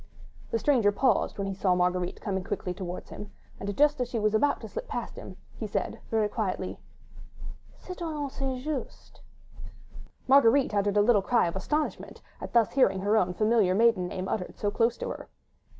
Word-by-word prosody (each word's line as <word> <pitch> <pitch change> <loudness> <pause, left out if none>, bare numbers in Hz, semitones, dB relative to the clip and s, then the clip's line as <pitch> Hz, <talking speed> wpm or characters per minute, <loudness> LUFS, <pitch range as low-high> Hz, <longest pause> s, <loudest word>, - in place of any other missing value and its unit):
The - - 0
stranger 230 -4 +3
paused 245 +1 +1
when 200 - -2
he 195 - -3
saw 185 -1 +1
Marguerite 180 0 0
coming 190 -3 -2
quickly 195 -1 -3
towards 180 -1 -7
him, 205 - -8 0.3
and 200 0 -4
just 295 -2 +3
as 250 - 0
she 240 - -3
was 215 -1 +1
about 285 +7 +2
to - - -7
slip 485 +1 -6
past - - -5
him, - - -10 0.2
he - - -5
said - - -3
very 220 -2 +2
quietly: 190 -4 -3 1.0
"Citoyenne 320 -6 -5
St. 260 -2 -4
Just." 300 -3 -6 1.1
Marguerite 265 -2 +5
uttered 205 0 +1
a - - +6
little 215 -2 +4
cry 235 +5 +2
of 170 - -4
astonishment, 300 +11 -2 0.2
at - - -6
thus 230 -3 +4
hearing 195 -8 +3
her 205 +3 +2
own 180 -4 +1
familiar 215 -3 +3
maiden 220 -4 +3
name 185 +1 -4
uttered 180 - -3
so 205 - -1
close 230 +2 +1
to - - -4
her. - - -7
215 Hz, 180 wpm, -28 LUFS, 190-255 Hz, 1.1 s, a